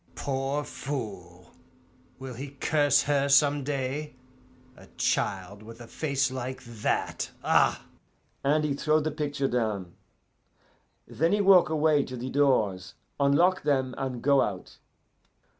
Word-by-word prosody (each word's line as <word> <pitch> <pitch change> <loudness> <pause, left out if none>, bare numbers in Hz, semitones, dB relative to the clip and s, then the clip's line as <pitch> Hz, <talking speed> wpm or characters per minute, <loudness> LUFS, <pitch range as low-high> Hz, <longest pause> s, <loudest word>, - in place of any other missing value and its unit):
'Poor 135 +1 -2
fool! 95 -13 -7 0.7
Will 130 -1 -8
he 140 +3 -9
curse 145 -3 +3
her 140 -1 +1
some 145 +1 +4
day 140 +1 -3 0.6
a - - -16
child 100 +1 -1
with 115 +2 -12
a 120 - -9
face 140 0 -1
like 130 0 -5
that? 115 -3 -2
Ah!' - - +2 0.6
And 150 +2 +2
he 150 -2 0
throw 155 +2 +1
the 155 +1 -2
picture 145 -2 -2
down. 105 -8 -2 1.1
Then 165 +4 0
he 210 - +2
walk 190 -4 +6
away 155 -2 +2
to 130 - -7
the 125 +2 -5
doors, 110 -10 +1 0.2
unlock 170 +7 +3
them, 135 -3 0
and 130 -3 -4
go 140 -1 +4
out. 95 -3 -4
135 Hz, 130 wpm, -27 LUFS, 120-145 Hz, 1.1 s, walk